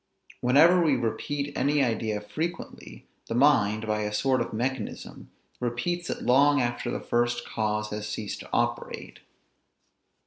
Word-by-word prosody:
Whenever 160 Hz, +9 st, +5 dB
we 150 Hz, -4 st, +3 dB
repeat 140 Hz, +4 st, -3 dB
any 145 Hz, +1 st, +2 dB
idea 110 Hz, -3 st, -1 dB
frequently, 105 Hz, -, -6 dB, 0.2 s
the 115 Hz, -, -3 dB
mind, 115 Hz, -6 st, +3 dB
by 105 Hz, 0 st, -1 dB
a 105 Hz, 0 st, -2 dB
sort 130 Hz, +4 st, +1 dB
of 115 Hz, -, -3 dB
mechanism, 120 Hz, 0 st, -4 dB, 0.3 s
repeats 125 Hz, +9 st, -2 dB
it -, -, -4 dB
long 145 Hz, +3 st, +4 dB
after 120 Hz, -1 st, -1 dB
the -, -, -2 dB
first 120 Hz, 0 st, 0 dB
cause 105 Hz, -1 st, -2 dB
has 105 Hz, 0 st, -4 dB
ceased 105 Hz, -1 st, -4 dB
to -, -, -11 dB
operate. -, -, -2 dB
120 Hz, 140 wpm, -27 LUFS, 110-140 Hz, 0.3 s, Whenever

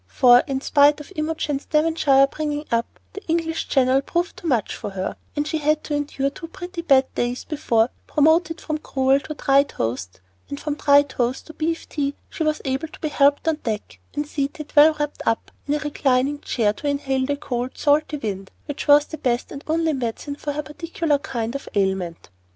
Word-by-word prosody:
For, 245 Hz, -, +6 dB
in 270 Hz, -1 st, -2 dB
spite 290 Hz, +1 st, +4 dB
of 295 Hz, +6 st, -11 dB
Imogen's 305 Hz, -2 st, -2 dB
Devonshire 300 Hz, -3 st, +4 dB
bringing 295 Hz, +1 st, -3 dB
up, 230 Hz, 0 st, -1 dB
the 400 Hz, 0 st, -8 dB
English 325 Hz, 0 st, -1 dB
Channel 265 Hz, 0 st, +3 dB
proved 345 Hz, +5 st, -2 dB
too 345 Hz, -, -7 dB
much 240 Hz, -9 st, 0 dB
for -, -, -5 dB
her, 190 Hz, -1 st, -4 dB, 0.2 s
and 295 Hz, 0 st, -1 dB
she 315 Hz, 0 st, -1 dB
had 305 Hz, +1 st, +1 dB
to 300 Hz, -, -4 dB
endure 285 Hz, -1 st, -1 dB
two 330 Hz, +3 st, -9 dB
pretty 355 Hz, +1 st, -7 dB
bad 270 Hz, -5 st, +3 dB
days 245 Hz, +1 st, -2 dB
before, 245 Hz, -7 st, +1 dB, 0.2 s
promoted 320 Hz, +2 st, +3 dB
from 310 Hz, -1 st, -3 dB
gruel 270 Hz, -2 st, +2 dB
to 305 Hz, +2 st, -7 dB
dry 275 Hz, -1 st, +4 dB
toast, 115 Hz, -, -4 dB, 0.3 s
and 285 Hz, -, -5 dB
from 300 Hz, -, -2 dB
dry 285 Hz, -1 st, +5 dB
toast 255 Hz, -2 st, -2 dB
to 315 Hz, -, -11 dB
beef 325 Hz, +2 st, -2 dB
tea, 285 Hz, -1 st, -2 dB, 0.2 s
she -, -, -7 dB
was 310 Hz, -1 st, 0 dB
able 270 Hz, +4 st, -1 dB
to -, -, -14 dB
be 310 Hz, -, -2 dB
helped 285 Hz, +2 st, +3 dB
on 320 Hz, -1 st, +2 dB
deck, 220 Hz, -7 st, -5 dB, 0.2 s
and 295 Hz, 0 st, -1 dB
seated, 290 Hz, +1 st, -4 dB
well 305 Hz, +1 st, +7 dB
wrapped 295 Hz, 0 st, -3 dB
up, 225 Hz, -, 0 dB, 0.2 s
in 290 Hz, -, +1 dB
a -, -, +1 dB
reclining 285 Hz, -2 st, 0 dB
chair 210 Hz, -4 st, +1 dB
to 290 Hz, -, -6 dB
inhale 270 Hz, -2 st, 0 dB
the 285 Hz, 0 st, -1 dB
cold, 250 Hz, -2 st, -4 dB
salty 300 Hz, +1 st, +2 dB
wind 195 Hz, -6 st, -4 dB, 0.2 s
which 290 Hz, +1 st, -5 dB
was 290 Hz, 0 st, +7 dB
the 315 Hz, -, -8 dB
best 240 Hz, -1 st, -1 dB
and 280 Hz, -, -8 dB
only 320 Hz, 0 st, +1 dB
medicine 260 Hz, +2 st, -3 dB
for 290 Hz, 0 st, -4 dB
her 300 Hz, +1 st, -3 dB
particular 305 Hz, 0 st, -1 dB
kind 235 Hz, -4 st, -3 dB
of 275 Hz, -, -6 dB
ailment. 190 Hz, -, -1 dB
285 Hz, 200 wpm, -22 LUFS, 260-310 Hz, 0.3 s, well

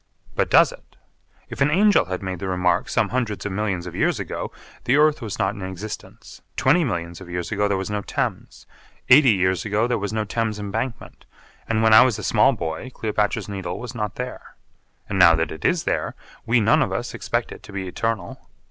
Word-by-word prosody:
But -, -, 0 dB
does -, -, +6 dB
it? -, -, -16 dB, 0.5 s
If -, -, -8 dB
an 140 Hz, -, +4 dB
angel 200 Hz, -, +4 dB
had 95 Hz, +2 st, -5 dB
made 95 Hz, -2 st, -4 dB
the 95 Hz, -, -4 dB
remark 90 Hz, -1 st, +1 dB
some 110 Hz, -3 st, +1 dB
hundreds 120 Hz, -5 st, -2 dB
of 105 Hz, -, -2 dB
millions 95 Hz, -3 st, -2 dB
of 90 Hz, -, -7 dB
years -, -, +1 dB
ago, -, -, -5 dB, 0.3 s
the 125 Hz, -, +3 dB
earth 150 Hz, -1 st, +3 dB
was 110 Hz, -4 st, -5 dB
not 95 Hz, -1 st, 0 dB
in 100 Hz, -, -9 dB
existence, 95 Hz, +3 st, -8 dB
twenty 160 Hz, +7 st, +3 dB
millions 85 Hz, -, -3 dB
of 90 Hz, -, -11 dB
years 90 Hz, 0 st, -4 dB
ago 105 Hz, -1 st, +1 dB
there 100 Hz, -1 st, 0 dB
was 95 Hz, +2 st, -4 dB
no 105 Hz, 0 st, -1 dB
Thames, -, -, -4 dB, 0.4 s
eighty 135 Hz, +1 st, +8 dB
years 95 Hz, -2 st, +1 dB
ago 105 Hz, +1 st, +1 dB
there 120 Hz, -2 st, 0 dB
was 100 Hz, 0 st, -3 dB
no 110 Hz, 0 st, -1 dB
Thames 110 Hz, 0 st, -2 dB
Embankment, 110 Hz, +4 st, -5 dB, 0.4 s
and 110 Hz, -1 st, +1 dB
when 110 Hz, 0 st, +5 dB
I 110 Hz, -, +10 dB
was 125 Hz, -4 st, +3 dB
a 105 Hz, -, -7 dB
small -, -, +4 dB
boy 80 Hz, +10 st, -4 dB
Cleopatra's 105 Hz, -4 st, -1 dB
Needle 95 Hz, -3 st, -5 dB
was 125 Hz, 0 st, -7 dB
not 105 Hz, -3 st, -4 dB
there. 125 Hz, 0 st, -7 dB, 0.5 s
And 95 Hz, -, -2 dB
now 85 Hz, -2 st, +8 dB
that 80 Hz, 0 st, -1 dB
it 80 Hz, -, -8 dB
is 170 Hz, -2 st, +2 dB
there, -, -, -2 dB, 0.3 s
we 120 Hz, +1 st, +4 dB
none 105 Hz, -, +4 dB
of -, -, 0 dB
us -, -, -3 dB
expect -, -, -2 dB
it -, -, -10 dB
to -, -, -13 dB
be 100 Hz, -1 st, -4 dB
eternal. 110 Hz, -1 st, -4 dB
105 Hz, 215 wpm, -23 LUFS, 95-115 Hz, 0.5 s, I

